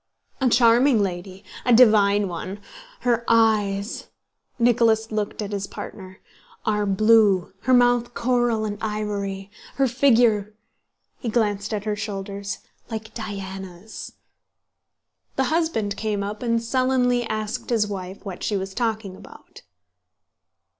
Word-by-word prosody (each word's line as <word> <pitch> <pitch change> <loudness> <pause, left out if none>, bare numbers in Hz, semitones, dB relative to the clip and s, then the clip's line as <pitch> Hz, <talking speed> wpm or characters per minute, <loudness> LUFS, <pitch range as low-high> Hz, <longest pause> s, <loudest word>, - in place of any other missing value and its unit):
"A 260 - +4
charming 235 0 +5
lady, 185 +1 -5 0.2
a 245 - +1
divine 210 -4 +5
one. 185 +3 -6 0.4
Her 235 -1 +1
eyes" 215 -2 +2 0.5
(Nicholas 230 -2 +3
looked 215 0 -2
at 205 - -6
his 200 -1 -3
partner) 190 -2 -9 0.5
"are 210 -1 +1
blue, 200 -2 +4
her 260 - +3
mouth 245 -1 +3
coral 240 -2 +1
and 205 -1 -4
ivory; 205 -2 -3 0.2
her 270 -1 +2
figure" 230 -5 +3 0.6
(he 235 - -3
glanced 210 -3 0
at 210 -2 -2
her 210 -1 -1
shoulders) 200 -1 -5 0.2
"like 220 -1 -6
Diana's...." 195 -2 -7 1.2
The 265 - +2
husband 275 -12 0
came 210 -2 -2
up 205 +1 -5
and 230 -1 0
sullenly 250 0 +1
asked 215 +1 -4
his 225 -3 +2
wife 195 -1 -7
what 190 -3 -7
she 205 - 0
was 190 0 -5
talking 220 -4 -2
about. - - -15
215 Hz, 125 wpm, -23 LUFS, 200-235 Hz, 1.2 s, charming